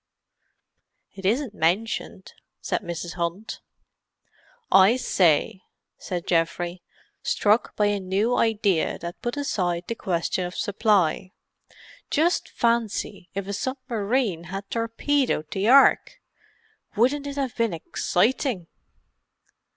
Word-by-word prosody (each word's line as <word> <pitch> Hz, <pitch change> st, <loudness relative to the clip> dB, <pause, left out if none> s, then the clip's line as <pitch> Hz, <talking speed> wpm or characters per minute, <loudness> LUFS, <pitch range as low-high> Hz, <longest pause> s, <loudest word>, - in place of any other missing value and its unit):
"It 195 Hz, -1 st, -4 dB
isn't 240 Hz, +2 st, 0 dB
mentioned," 190 Hz, +2 st, -1 dB, 0.3 s
said -, -, -2 dB
Mrs. 170 Hz, 0 st, -5 dB
Hunt. 175 Hz, +5 st, -4 dB, 1.1 s
"I 195 Hz, +5 st, +7 dB
say!" 185 Hz, -, +2 dB, 0.4 s
said 175 Hz, -2 st, -4 dB
Geoffrey, 175 Hz, +1 st, 0 dB, 0.4 s
struck 210 Hz, +3 st, +1 dB
by 210 Hz, -, +2 dB
a 205 Hz, -1 st, +1 dB
new 195 Hz, +6 st, 0 dB
idea 205 Hz, -6 st, +1 dB
that 170 Hz, 0 st, -8 dB
put 240 Hz, +3 st, -3 dB
aside 180 Hz, -11 st, -1 dB
the -, -, -2 dB
question 180 Hz, -3 st, -2 dB
of 180 Hz, -, -10 dB
supply. 195 Hz, -4 st, +1 dB, 0.8 s
"Just 335 Hz, +4 st, +1 dB
fancy 230 Hz, -5 st, -1 dB
if 195 Hz, -1 st, -3 dB
a 200 Hz, -, -3 dB
submarine 230 Hz, -5 st, -2 dB
had 195 Hz, +3 st, -6 dB
torpedoed 230 Hz, -, 0 dB
the 195 Hz, +2 st, -1 dB
Ark! 270 Hz, +3 st, +5 dB, 0.8 s
Wouldn't 275 Hz, +6 st, +2 dB
it 280 Hz, -, -5 dB
have 270 Hz, -3 st, -2 dB
been 230 Hz, -2 st, +1 dB
exciting!" 200 Hz, -, 0 dB
205 Hz, 110 wpm, -24 LUFS, 180-235 Hz, 1.1 s, I